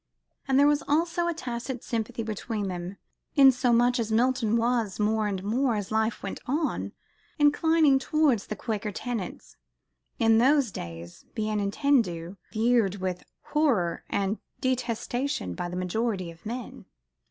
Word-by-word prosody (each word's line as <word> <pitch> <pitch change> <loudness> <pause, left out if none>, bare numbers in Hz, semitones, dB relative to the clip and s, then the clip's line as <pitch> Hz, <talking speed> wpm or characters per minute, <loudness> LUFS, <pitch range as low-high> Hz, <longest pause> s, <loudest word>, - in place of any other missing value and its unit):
And 265 -1 +3
there 285 - +6
was 295 0 +3
also 335 +3 +1
a 345 - 0
tacit 245 -3 -5
sympathy 230 -1 -3
between 215 -1 -3
them, 180 +2 -5 0.4
insomuch 250 -3 +5
as 225 -1 -2
Milton 235 -1 +2
was, 230 -4 0
more 215 0 +1
and 190 -2 -3
more, 240 +4 +1
as 205 -1 -4
life 220 +1 0
went 195 - -4
on, 300 +4 -1 0.4
inclining 295 -1 +4
towards 275 -5 +1
the 215 - -4
Quaker 215 0 -3
tenets, 225 -4 -5 0.6
in 225 -1 +4
those 270 -1 +4
days, 85 - -8
bien 215 -1 -1
entendu, 200 - 0
viewed 220 -3 +2
with 185 -2 -3 0.3
horror 240 - +1
and 200 +2 -1 0.2
detestation 250 - -2
by 175 - -4
the 180 - -6
majority 185 -1 -1
of 165 +5 -12
men. 240 +1 -6
230 Hz, 140 wpm, -27 LUFS, 200-260 Hz, 0.6 s, there